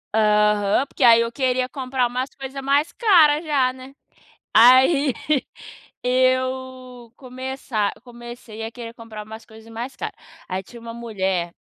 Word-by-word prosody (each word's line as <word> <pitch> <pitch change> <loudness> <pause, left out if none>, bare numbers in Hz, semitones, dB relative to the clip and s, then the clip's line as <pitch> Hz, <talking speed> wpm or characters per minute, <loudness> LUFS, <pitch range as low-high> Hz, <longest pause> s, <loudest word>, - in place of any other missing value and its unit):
Aham, 210 +2 +3
porque 275 - -4
aí 230 -1 +7
eu 230 0 -2
queria 255 -1 0
comprar 255 -1 -2
umas 255 +2 -3
coisa 270 0 -7
mais 280 +3 +1
cara 325 -9 +4
já, 275 -5 +1
né, 260 +1 -13 0.6
aí, 260 +3 +6 0.9
eu 255 -1 -1
começa 255 -4 -4
comecei 240 -2 -10
a 225 - -5
querer 230 -2 -8
comprar 220 -3 -9
umas 220 +1 -11
coisas 220 0 -15
mais 240 +4 -7
cara. - - -5 0.4
Aí 185 +1 -3
tinha 235 +4 -14
uma 230 0 -8
mulher, 190 -7 -2
250 Hz, 140 wpm, -22 LUFS, 225-260 Hz, 0.9 s, aí